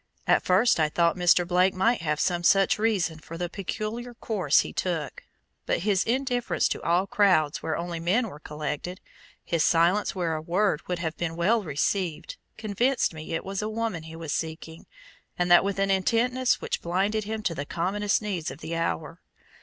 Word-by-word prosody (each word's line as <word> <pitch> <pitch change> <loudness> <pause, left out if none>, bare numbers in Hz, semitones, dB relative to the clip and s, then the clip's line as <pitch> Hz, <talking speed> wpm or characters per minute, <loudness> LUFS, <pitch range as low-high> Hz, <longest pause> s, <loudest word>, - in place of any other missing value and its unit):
At - - +4
first 190 +3 +3
I 155 -1 +3
thought 170 +1 +2
Mr. 175 -1 +3
Blake 180 +1 +3
might 225 +4 +2
have 150 -2 -1
some 175 0 0
such 195 +3 +4
reason 190 -8 0
for 165 +2 -9
the 175 0 -3
peculiar 215 +6 -5
course 190 - +2
he - - -7
took. 170 -5 -3 0.5
But - - 0
his 200 0 +2
indifference 245 0 0
to - - -3
all 175 +3 +2
crowds 185 -7 +2
where 160 - -2
only 170 0 -4
men 200 +9 +1
were 150 -7 -10
collected, 150 +4 -5 0.5
his 165 -2 +1
silence 175 +6 +2
where 170 -3 -1
a 155 - -4
word 175 0 +1
would 180 - -1
have 165 -2 -3
been 165 -1 -3
well 210 +7 +2
received, 165 +1 -2 0.2
convinced 220 +2 0
me 155 +1 -5
it 165 - -4
was 195 +1 -3
a 215 - -2
woman 220 -6 -2
he 160 0 -10
was 165 -2 -6
seeking 160 0 -5 0.5
and 175 0 0
that 175 - +8
with 200 0 -2
an 195 0 +1
intentness 240 +6 +2
which - - -3
blinded 200 +5 0
him 220 0 -4
to 170 - 0
the 145 -2 -5
commonest 205 +5 0
needs 185 -6 -3
of - - -8
the 165 +1 -5
hour. 165 0 -3
180 Hz, 190 wpm, -26 LUFS, 165-210 Hz, 0.5 s, that